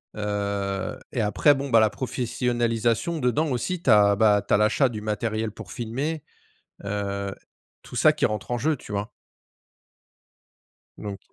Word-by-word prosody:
heu, 100 -2 -2
et - - -3
après 105 +8 +4
bon 140 +1 -4
bah 115 - +7
la 110 -1 +4
professionnalisation 120 +3 -1
dedans 135 +4 +1
aussi 165 +8 -2
tu 135 - -1
as 105 -1 +6
bah 105 -1 +4
tu - - +1
as - - +6
l'achat 110 +6 +3
du 110 -2 -6
matériel 110 +1 -2
pour 105 -2 -10
filmer. 135 +7 -3 0.6
Heu, 100 -1 -3 0.5
tout - - -11
ça - - +5
qui - - +1
rentre 105 +3 -3
en 120 - +1
jeu, 150 +5 0
tu 110 - -11
vois? 100 +1 -2 1.9
Donc 100 -2 -6
110 Hz, 155 wpm, -25 LUFS, 105-125 Hz, 1.9 s, bah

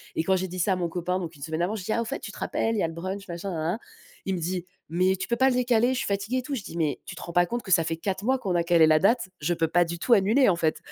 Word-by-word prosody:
et 160 - 0
quand 190 +2 +2
j'ai 185 0 -1
dit 180 +1 -7
ça 190 +2 +2
à - - +1
mon 175 -2 -2
copain, 180 +2 -2
donc 170 -3 -6
une 140 - -17
semaine 160 +1 -3
avant, 195 +5 0
je 195 - -6
dis: 215 - 0
«Ah, 230 - +1
au - - -3
fait, - - -4
tu 205 - -8
te - - -12
rappelles, 225 0 -1
il - - 0
y - - +1
a - - +2
le 165 - -7
brunch 190 +4 -5
machin, 175 +3 -5
nanana», 170 +6 -2 0.5
il 190 -1 0
me - - -3
dit: 180 +1 -3 0.2
«Mais 185 +3 +2
tu - - -4
peux 235 - +1
pas 265 +2 +4
le 250 - 0
décaler? 245 0 +3
Je - - -2
suis - - -2
fatigué 200 +5 -1
et - - 0
tout.» 275 +2 -4
Je 210 - -5
dis: 170 - -8
«Mais 155 -3 0
tu - - -8
te - - -8
rends 170 - -7
pas 175 0 +4
compte 240 +6 -3
que 190 - -8
ça 165 - +5
fait 165 0 -2
4 190 +3 -3
mois 260 0 +2
qu'on 190 -7 -2
a 170 - +2
calé 170 -2 +5
la 155 0 +5
date? 225 +1 +2
Je 175 +4 +1
peux 165 -1 0
pas 175 +2 +3
du 170 0 -5
tout 240 - +3
annuler, 220 +6 +4
en 180 - +3
fait». 160 -2 0
185 Hz, 370 wpm, -26 LUFS, 170-215 Hz, 0.5 s, ça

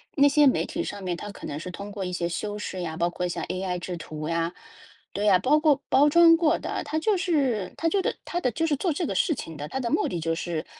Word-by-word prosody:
那 285 0 +6
些 290 +1 +5
媒 260 - +2
体 340 +2 -3
上 200 -1 -6
面 175 -2 -2
她 205 - -7
可 - - -10
能 145 +1 -4
是 180 - -6
通 200 +3 -7
过 200 -2 -4
一 180 - -4
些 170 -1 -1
修 205 +4 -3
饰 190 -3 -5
呀， 160 -2 -4
包 170 +1 +1
括 180 +1 -3
像 175 - -4
AI 185 -1 -3
制 175 0 -5
图 155 -1 -6
呀， 165 +1 -1 0.6
对 205 +2 -2
呀， 195 -3 +6
包 295 +9 +3
括 295 -3 +3
包 285 +2 +5
装 335 +1 +7
过 325 -2 +3
的， - - -4
她 310 - -2
就 410 +2 +2
是 275 - 0
她 330 - 0
就 390 +3 +1
的 - - -1
她 350 - -3
的 255 - +1
就 325 +1 -1
是 305 - +1
做 345 -1 0
这 340 - -2
个 - - -2
事 320 - +2
情 165 - -7
的， 145 +1 -5
她 265 - -4
的 240 -3 -2
目 - - +2
的 175 - -3
就 165 0 0
是， 165 -1 -3
205 Hz, 305 characters per minute, -26 LUFS, -, 0.6 s, 装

